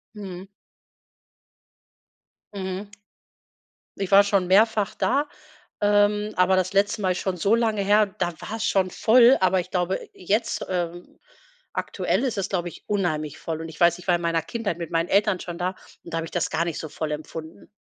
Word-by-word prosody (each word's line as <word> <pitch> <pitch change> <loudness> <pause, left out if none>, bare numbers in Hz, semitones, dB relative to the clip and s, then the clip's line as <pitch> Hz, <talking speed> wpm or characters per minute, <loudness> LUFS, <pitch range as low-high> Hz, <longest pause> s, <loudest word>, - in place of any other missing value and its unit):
Mhm. 190 -2 -8 2.1
Mhm. 190 +1 -5 1.1
Ich 195 -1 -3
war 200 +1 +8
schon 200 -3 +1
mehrfach 210 +2 +3
da, 285 +4 +1 0.5
ähm, 205 0 +3
aber 180 +1 +4
das 185 +1 0
letzte 200 +2 +2
Mal 185 -2 +1
ist 180 - -2
schon 190 -2 -2
so 200 +6 +3
lange 220 -3 +1
her, 205 +2 +4
da 185 -3 -3
war's 220 0 -4
schon 185 -2 +1
voll, 240 +6 +6
aber 185 0 +3
ich 180 0 -6
glaube, 180 +1 0
jetzt 215 +6 -1
ähm, 175 -1 -4 0.5
aktuell - - -1
ist 245 -5 -1
es, 195 -1 -2
glaube 175 -2 -2
ich, - - -14
unheimlich 155 -7 -1
voll. 160 -1 -4
Und 165 - -6
ich 160 - -12
weiß, 170 -1 +4
ich 180 - -14
war 175 - +4
in 170 - -3
meiner 165 -1 +1
Kindheit 225 -3 -3
mit 170 -1 -6
meinen 165 +1 0
Eltern 200 -1 +2
schon 175 -1 -6
da, 180 +1 0 0.3
und 170 - -11
da - - 0
hab 165 - -3
ich - - -11
das 175 - -1
gar 170 - 0
nicht 170 -3 -3
so 160 - -6
voll 155 0 -4
empfunden. 160 +3 -7
185 Hz, 190 wpm, -24 LUFS, 175-205 Hz, 2.1 s, war